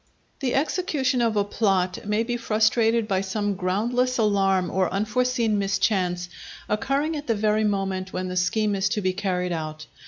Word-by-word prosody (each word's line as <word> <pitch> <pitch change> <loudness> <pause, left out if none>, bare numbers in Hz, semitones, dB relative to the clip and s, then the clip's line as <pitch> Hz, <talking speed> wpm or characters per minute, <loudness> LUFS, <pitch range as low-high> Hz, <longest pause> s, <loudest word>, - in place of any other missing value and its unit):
The 260 -4 -1
execution 285 -4 0
of 225 -2 +1
a 205 - +3
plot 195 -3 0
may 210 +2 +1
be 240 +1 -2
frustrated 225 0 +2
by 190 -2 +1
some 205 +1 -1
groundless 230 +7 0
alarm 195 -4 +2
or 185 -1 +1
unforeseen 225 +2 0
mischance 190 -3 0 0.4
occurring 275 +9 0
at 295 0 -6
the 230 - +2
very 215 +1 +1
moment 195 -2 -1
when 185 0 -3
the 180 - -4
scheme 205 +4 +1
is 195 -1 +1
to 210 0 -1
be 185 -1 0
carried 180 -2 -1
out. 155 -2 -4
210 Hz, 165 wpm, -24 LUFS, 190-230 Hz, 0.4 s, a